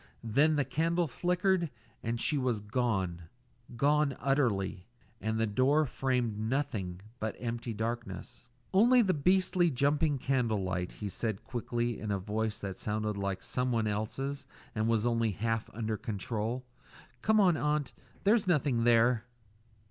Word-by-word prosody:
Then 140 Hz, +8 st, +3 dB
the 145 Hz, -2 st, +1 dB
candle 165 Hz, +5 st, +1 dB
flickered 180 Hz, +3 st, +1 dB, 0.3 s
and 115 Hz, +1 st, -2 dB
she 150 Hz, -, +2 dB
was 125 Hz, -5 st, 0 dB
gone 100 Hz, -7 st, -1 dB, 0.5 s
gone 145 Hz, +2 st, +2 dB
utterly 110 Hz, -9 st, 0 dB, 0.3 s
and 110 Hz, 0 st, -1 dB
the 110 Hz, -, +2 dB
door 130 Hz, +8 st, +3 dB
framed 125 Hz, -5 st, -1 dB
nothing 110 Hz, -7 st, -2 dB, 0.2 s
but 110 Hz, -1 st, -2 dB
empty 120 Hz, 0 st, -4 dB
darkness. 115 Hz, +1 st, -5 dB, 0.3 s
"Only 240 Hz, +5 st, +6 dB
the 190 Hz, -3 st, +2 dB
beastly 180 Hz, +2 st, +3 dB
jumping 145 Hz, +2 st, +2 dB
candle 120 Hz, -6 st, 0 dB
light," 90 Hz, -1 st, -2 dB
he 105 Hz, -, -5 dB
said 105 Hz, +1 st, -3 dB
quickly, 120 Hz, -1 st, -2 dB
in 105 Hz, -, -5 dB
a 100 Hz, -, +1 dB
voice 105 Hz, +3 st, -2 dB
that 95 Hz, -2 st, -4 dB
sounded 105 Hz, 0 st, -2 dB
like 100 Hz, -1 st, -3 dB
someone 115 Hz, -1 st, 0 dB
else's 130 Hz, +7 st, -3 dB, 0.3 s
and 110 Hz, +1 st, 0 dB
was 115 Hz, -1 st, +2 dB
only 115 Hz, -3 st, +1 dB
half 115 Hz, +2 st, -1 dB
under 110 Hz, -1 st, -2 dB
control. 110 Hz, +2 st, -3 dB, 0.6 s
"Come 215 Hz, +1 st, +4 dB
on, 180 Hz, -5 st, +5 dB
aunt. 150 Hz, -3 st, 0 dB, 0.3 s
There's 210 Hz, 0 st, +3 dB
nothing 140 Hz, -8 st, +2 dB
there." 120 Hz, 0 st, +4 dB
120 Hz, 140 wpm, -31 LUFS, 110-145 Hz, 0.6 s, Only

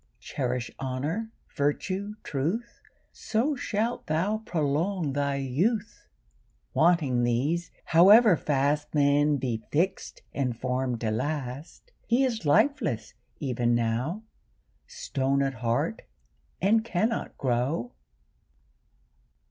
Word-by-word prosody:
Cherish 125 Hz, -2 st, -3 dB
honour, 145 Hz, -, -3 dB, 0.3 s
virtue, 185 Hz, +8 st, -1 dB
truth, 175 Hz, -, -3 dB, 0.3 s
So 255 Hz, +7 st, -1 dB
shalt 230 Hz, -1 st, -2 dB
thou 185 Hz, +8 st, 0 dB
prolong 165 Hz, -2 st, -1 dB
thy 140 Hz, 0 st, 0 dB
youth. 190 Hz, -, -1 dB, 0.7 s
Wanting 155 Hz, -7 st, +3 dB
these, 135 Hz, +9 st, 0 dB, 0.2 s
however 200 Hz, +5 st, +7 dB
fast 145 Hz, +1 st, 0 dB
Man 145 Hz, 0 st, +3 dB
be 120 Hz, -5 st, -2 dB
fix'd 185 Hz, +5 st, -1 dB
and 125 Hz, -4 st, -1 dB
form'd 125 Hz, -1 st, -2 dB
to 110 Hz, -2 st, 0 dB
last, 140 Hz, -, -4 dB, 0.2 s
He 240 Hz, +3 st, +3 dB
is 230 Hz, -, -1 dB
lifeless 155 Hz, -, +2 dB, 0.3 s
even 120 Hz, -4 st, 0 dB
now, 120 Hz, -, -1 dB, 0.6 s
Stone 140 Hz, -, -1 dB
at 135 Hz, 0 st, -1 dB
heart, 115 Hz, 0 st, 0 dB, 0.6 s
and 220 Hz, +4 st, +3 dB
cannot 225 Hz, +1 st, -1 dB
grow. 125 Hz, 0 st, -1 dB
145 Hz, 100 wpm, -27 LUFS, 130-200 Hz, 0.7 s, however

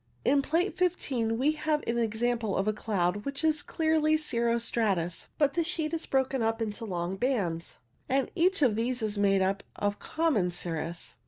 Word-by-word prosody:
In 280 Hz, 0 st, +4 dB
Plate 335 Hz, +7 st, 0 dB
15 260 Hz, -11 st, 0 dB
we 275 Hz, +5 st, +3 dB
have 305 Hz, 0 st, -1 dB
an 235 Hz, +1 st, 0 dB
example 230 Hz, -1 st, 0 dB
of 195 Hz, +2 st, 0 dB
a 215 Hz, -, +2 dB
cloud 200 Hz, -4 st, 0 dB
which 280 Hz, +2 st, -3 dB
is 310 Hz, -1 st, +2 dB
clearly 315 Hz, 0 st, +2 dB
cirro 235 Hz, -6 st, 0 dB
stratus, 195 Hz, -7 st, 0 dB
but 290 Hz, -2 st, +3 dB
the 340 Hz, -, +1 dB
sheet 320 Hz, -2 st, -1 dB
is 330 Hz, -, -2 dB
broken 265 Hz, -1 st, +1 dB
up 225 Hz, 0 st, 0 dB
into 225 Hz, 0 st, -3 dB
long 180 Hz, -1 st, -3 dB
bands, 195 Hz, -10 st, -1 dB, 0.3 s
and 270 Hz, 0 st, +1 dB
each 360 Hz, -1 st, +2 dB
of 235 Hz, -6 st, +4 dB
these 240 Hz, +2 st, -1 dB
is 210 Hz, -1 st, -1 dB
made 195 Hz, -1 st, +3 dB
up 195 Hz, +1 st, 0 dB
of 205 Hz, 0 st, -1 dB
common 310 Hz, -, +1 dB
cirrus. 170 Hz, -1 st, -4 dB
235 Hz, 180 wpm, -29 LUFS, 200-300 Hz, 0.3 s, In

